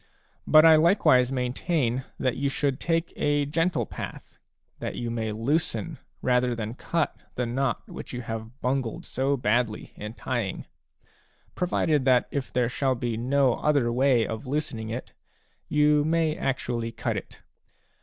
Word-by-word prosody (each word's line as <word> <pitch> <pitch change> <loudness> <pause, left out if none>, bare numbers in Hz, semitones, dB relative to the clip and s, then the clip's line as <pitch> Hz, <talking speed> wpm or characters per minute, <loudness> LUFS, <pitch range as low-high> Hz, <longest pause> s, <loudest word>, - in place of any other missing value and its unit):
But 155 +1 +7
I 160 -1 +8
likewise 155 - +4
maintain 130 0 -1
that 130 -2 0
you 140 +1 0
should 140 -1 -1
take 165 0 0
a 145 -1 +1
gentle 165 +4 0
path, - - -8 0.4
that - - -4
you 120 -1 -3
may 110 -2 -2
loosen 150 +7 -1 0.2
rather 125 -1 +2
than 110 -1 -4
cut 165 +5 -1 0.2
the 125 - -1
knot 130 +3 -1
which - - -8
you 125 - -4
have 115 +3 -6
bungled 130 -3 -1
so 135 +2 0
badly 115 -1 0
in 105 +1 -7
tying, 120 -5 -3 0.4
— - - -36
provided 160 -5 +1
that 130 -2 +4
if 140 -2 -3
there 125 -1 +1
shall 130 +1 0
be 120 -1 -2
no 130 +2 +2
other 140 -6 +2
way 125 -2 +3
of 110 +5 -5
loosening 130 -6 -3
it, 120 +3 -6 0.6
you 150 0 +4
may 160 0 +1
actually 120 -3 -2
cut - - -2
it. - - -7
130 Hz, 155 wpm, -26 LUFS, 120-150 Hz, 0.6 s, I